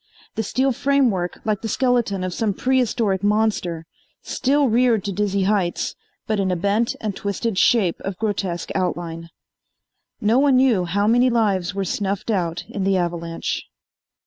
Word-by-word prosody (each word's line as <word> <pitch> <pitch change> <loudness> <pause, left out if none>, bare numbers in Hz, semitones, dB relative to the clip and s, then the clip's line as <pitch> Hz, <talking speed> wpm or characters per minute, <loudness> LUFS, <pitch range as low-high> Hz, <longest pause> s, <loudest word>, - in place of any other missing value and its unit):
The - - -2
steel 260 +5 +1
framework, 245 -9 +1
like 215 -2 0
the 225 - -3
skeleton 235 -6 +1
of 185 -1 -3
some 210 -1 -1
prehistoric 235 -7 +1
monster, 205 -6 0 0.4
still 280 +1 +1
reared 235 -2 +3
to 205 - -3
dizzy 200 0 0
heights 190 -3 0 0.3
but 215 -1 -1
in 190 -1 +1
a 180 - +1
bent 200 +6 0
and 210 -3 -3
twisted 200 +2 -2
shape 195 -7 +3
of 195 -2 -5
grotesque 195 -5 -2
outline. 170 -2 -3 0.9
No 220 +4 +3
one 280 -1 +4
knew 245 -9 +3
how 200 +4 0
many 245 +4 +4
lives 200 -6 +1
were 195 -1 -1
snuffed 200 +4 -2
out 175 -4 -1
in 195 - -4
the 195 0 +2
avalanche. 170 -1 -2
205 Hz, 155 wpm, -22 LUFS, 185-230 Hz, 0.9 s, one